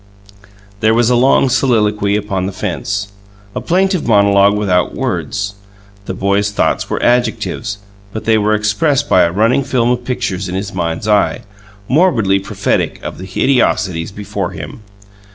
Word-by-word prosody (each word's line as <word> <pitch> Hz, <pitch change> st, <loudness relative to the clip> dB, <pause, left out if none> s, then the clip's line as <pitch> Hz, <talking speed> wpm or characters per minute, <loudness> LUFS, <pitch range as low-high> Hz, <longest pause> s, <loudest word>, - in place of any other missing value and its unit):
There 110 Hz, +1 st, +3 dB
was 120 Hz, +1 st, +3 dB
a -, -, +4 dB
long 130 Hz, +2 st, +4 dB
soliloquy 105 Hz, -6 st, +1 dB
upon 100 Hz, -3 st, -2 dB
the -, -, -3 dB
fence, 100 Hz, +2 st, -3 dB, 0.4 s
a -, -, -2 dB
plaintive 185 Hz, -2 st, 0 dB
monologue 100 Hz, -2 st, +4 dB
without 90 Hz, -4 st, 0 dB
words: 100 Hz, 0 st, -3 dB, 0.5 s
the 95 Hz, -, -5 dB
boy's 100 Hz, +1 st, +1 dB
thoughts 100 Hz, -, -1 dB
were -, -, -2 dB
adjectives, 115 Hz, -3 st, 0 dB, 0.3 s
but 110 Hz, -, -6 dB
they 110 Hz, -1 st, +3 dB
were 105 Hz, +1 st, +2 dB
expressed 105 Hz, +8 st, +1 dB
by 90 Hz, -, +4 dB
a 85 Hz, -, +2 dB
running 115 Hz, +8 st, +2 dB
film 125 Hz, -2 st, +1 dB
of 125 Hz, 0 st, -1 dB
pictures 105 Hz, -7 st, -3 dB
in 90 Hz, -, -4 dB
his 100 Hz, +2 st, -4 dB
mind's 85 Hz, +2 st, -3 dB
eye, 105 Hz, -2 st, +2 dB, 0.5 s
morbidly 120 Hz, -, +2 dB
prophetic 95 Hz, -, -2 dB
of -, -, -6 dB
the 95 Hz, -, -8 dB
hideosities 95 Hz, -6 st, 0 dB
before 100 Hz, +1 st, -4 dB
him. -, -, -8 dB
105 Hz, 155 wpm, -15 LUFS, 100-120 Hz, 0.5 s, a